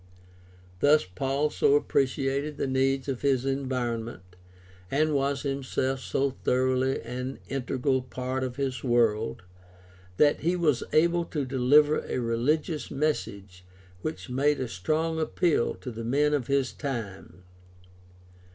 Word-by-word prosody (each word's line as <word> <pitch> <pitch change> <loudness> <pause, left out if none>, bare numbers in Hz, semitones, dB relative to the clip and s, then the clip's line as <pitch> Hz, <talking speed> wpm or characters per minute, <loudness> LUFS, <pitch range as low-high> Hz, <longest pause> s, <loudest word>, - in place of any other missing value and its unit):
Thus 150 +1 +4
Paul 135 +11 -1
so 140 - +3
appreciated 140 +1 0
the - - -1
needs 135 0 +1
of 135 -3 -3
his 135 -2 +1
environment, 120 -8 -3 0.5
and 155 +2 +1
was 140 -1 0
himself 135 -1 -1
so 135 +1 -1
thoroughly 130 +1 +1
an 125 +3 -5
integral 130 0 0
part 130 +1 -4
of 125 -1 -4
his 130 -3 -3
world, 115 -5 +1 0.7
that 145 -1 +4
he 175 +4 +1
was 155 -8 +2
able 170 +2 +3
to 150 -5 -3
deliver 140 +4 +4
a - - -3
religious 140 +7 0
message 100 -11 -3 0.4
which 155 - -5
made 140 +3 +1
a 130 - -2
strong 155 - -1
appeal 160 -3 +1
to 125 - -7
the 115 0 -6
men 145 +5 +2
of 140 -5 0
his 140 -2 +1
time. 100 - -6
135 Hz, 130 wpm, -27 LUFS, 125-145 Hz, 0.7 s, Thus